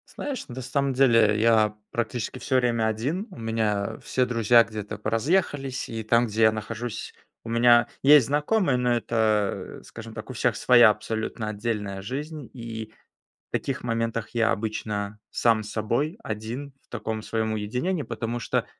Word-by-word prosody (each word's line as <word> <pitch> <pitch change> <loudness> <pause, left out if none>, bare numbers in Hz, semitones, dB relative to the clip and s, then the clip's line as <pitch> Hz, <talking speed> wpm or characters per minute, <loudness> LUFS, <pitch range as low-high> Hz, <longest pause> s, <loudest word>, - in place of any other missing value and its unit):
Знаешь, 280 -4 -4
на 130 0 -7
самом 135 +2 0
деле, 115 -5 +4
я 110 -2 +4 0.2
практически 120 +1 -3
всё 130 +2 -1
время 120 -3 +2
один. 140 - -2
У 185 - -13
меня 110 -2 -1
все 130 - 0
друзья 115 -1 +5
где-то 105 -2 -6
поразъехались, 135 - 0
и 115 0 -4
там, 115 +2 +3
где 110 +1 0
я 110 - +7
нахожусь, 110 +2 -5 0.3
у 115 - -8
меня 120 +1 +5 0.2
есть 140 -3 +7
знакомые, 150 +1 +2
но 125 -1 +2
это, 110 -3 0
скажем 115 0 -10
так, 110 +2 -8
у - - -5
всех 120 -2 +1
своя 120 -3 +7
абсолютно 110 +1 -3
отдельная 105 -2 -3
жизнь, 145 +6 -6
и 110 -3 -7 0.6
в - - -68
таких 135 -1 -2
моментах 115 -2 -2
я 115 -2 +2
обычно 105 -1 -3
сам 115 -2 +2
с 105 - -8
собой 120 - -1
один, 115 +6 -5
в - - -37
таком 110 -2 -4
своём 110 -1 -1
уединении, 125 - -2
потому 120 0 -4
что 115 - -1
115 Hz, 160 wpm, -25 LUFS, 110-125 Hz, 0.6 s, я